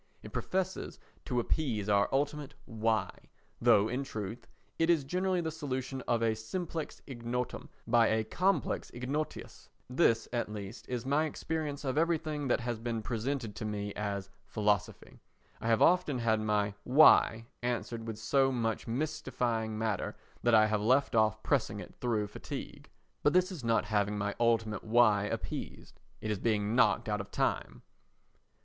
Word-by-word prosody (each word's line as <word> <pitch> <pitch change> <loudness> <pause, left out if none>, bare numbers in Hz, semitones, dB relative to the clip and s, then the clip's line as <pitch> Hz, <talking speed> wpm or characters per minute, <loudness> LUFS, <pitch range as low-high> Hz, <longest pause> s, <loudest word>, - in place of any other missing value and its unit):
It - - -10
professes 190 0 -2 0.3
to 125 -2 0
appease 120 -5 -1
our 100 -1 +3
ultimate 145 +1 -1
"Why?" 110 -4 0 0.5
though 105 +1 +5
in 125 +4 -2
truth 110 -4 -6 0.3
it 165 +1 +3
is 165 -4 +4
generally 180 +5 0
the 160 -1 -2
solution 135 -4 -4
of 115 -1 +1
a 115 -1 +3
simplex 160 +8 -5
ignotum 125 -1 -4 0.2
by 115 -1 +4
a 110 0 +2
complex 185 - 0
ignotius. 140 +5 -4 0.2
This, 125 -4 +2
at 120 -3 -1
least, 105 +1 -8
is 125 -1 -3
my 145 +4 +2
experience 150 -2 -3
of 135 +2 +1
everything 155 -3 0
that 125 - +2
has 120 -1 -3
been 115 -1 -3
presented 115 0 -3
to - - -5
me 105 -1 -3
as 100 -2 -4 0.2
philosophy. 105 -2 -1 0.4
I - - -3
have 115 -1 +4
often 175 -6 +3
had 115 -2 +2
my 105 -1 +1
"Why" 125 -5 +6 0.2
answered 120 -1 -3
with 110 -2 -4
so 135 +4 +2
much 115 -3 -1
mystifying 115 -5 -2
matter 110 -3 -2 0.2
that 120 -1 +4
I 110 0 +7
have 105 -1 0
left 130 +6 +3
off 110 -1 +2
pressing 110 -7 0
it - - -9
through 115 -4 +1
fatigue. 105 - -8 0.3
But 145 - +3
this 185 +1 +3
is 165 -9 -7
not 115 -2 +2
having 105 0 0
my 100 0 -1
ultimate 115 -3 +1
"Why?" 110 -3 +4
appeased. - - -5 0.2
It 110 - -2
is 105 - -2
being 105 0 0
knocked 125 - +3
out 105 -1 0
of 100 - -10
time. - - -1
115 Hz, 160 wpm, -31 LUFS, 110-140 Hz, 0.5 s, I